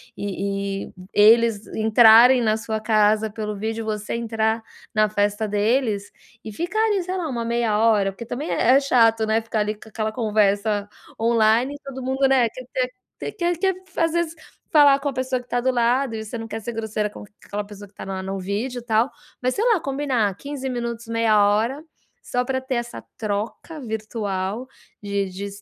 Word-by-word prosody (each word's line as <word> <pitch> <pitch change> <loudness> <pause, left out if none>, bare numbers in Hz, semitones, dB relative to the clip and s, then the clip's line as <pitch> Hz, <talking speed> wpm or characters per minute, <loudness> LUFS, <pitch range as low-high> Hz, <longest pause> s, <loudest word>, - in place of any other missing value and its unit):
e 205 0 -4 0.6
e - - -33 0.2
eles 220 0 +5
entrarem 225 +3 +7
na 215 -2 +2
sua 220 0 -3
casa 215 0 +2
pelo 210 0 -4
vídeo, 220 +2 -3
você 210 -1 -3
entrar 225 -1 -1 0.3
na 215 0 +3
festa 205 +1 0
deles 210 0 0 0.3
e 220 - -5
ficar 350 - -2
ali, 405 -4 +1
sei 370 +1 -3
lá, 345 - -2
uma 240 -5 -3
meia 230 -2 0
hora, 210 -3 +3
porque 235 +5 -8
também 260 +7 -5
é 245 - +3
é - - +5
chato, 225 -5 +3
né, 220 +1 +1
ficar, 225 -1 -3
ali, 210 0 0
com 215 - -15
aquela 215 0 -3
conversa 210 -2 +1 0.3
online 230 +3 +3
e - - -11
todo 265 -1 -7
mundo, 265 +2 0
né, 265 -3 +4
quer 255 +3 -10
ter 255 -1 0 0.4
quer 350 -3 -1
quer 380 +2 +1 0.2
às 330 -1 +2
vezes 340 -2 0 0.4
falar 290 -3 +7
com 285 +1 -2
a - - -5
pessoa 260 0 -1
que 245 - -22
tá 245 0 0
do 260 - +1
lado 245 0 +1
e 220 - -4
você 220 - -6
não 225 0 -6
quer 225 - -5
ser 235 - -5
grosseira 220 -2 -2
com 210 - -11 0.2
aquela 205 +1 -4
pessoa 205 0 -11
que 195 - -29
tá - - -9
na 190 -1 -4
no 195 +1 -4
vídeo, 215 +7 -3
tal, 230 +2 +1 0.3
mas 255 0 +1
sei 425 - -1
lá, 455 -6 +4
combinar 270 -8 0
15 275 0 -5
minutos, 235 -2 -4
meia 230 -1 +2
hora, 225 +8 +1 0.4
só 250 0 -1
pra 260 0 -1
ter 260 0 -3
essa 240 0 -4
troca 215 +9 -4
virtual, 215 -2 -3 0.4
de 200 -1 -1
de 185 +2 -7
s 200 0 -9
225 Hz, 195 wpm, -23 LUFS, 210-255 Hz, 0.6 s, entrarem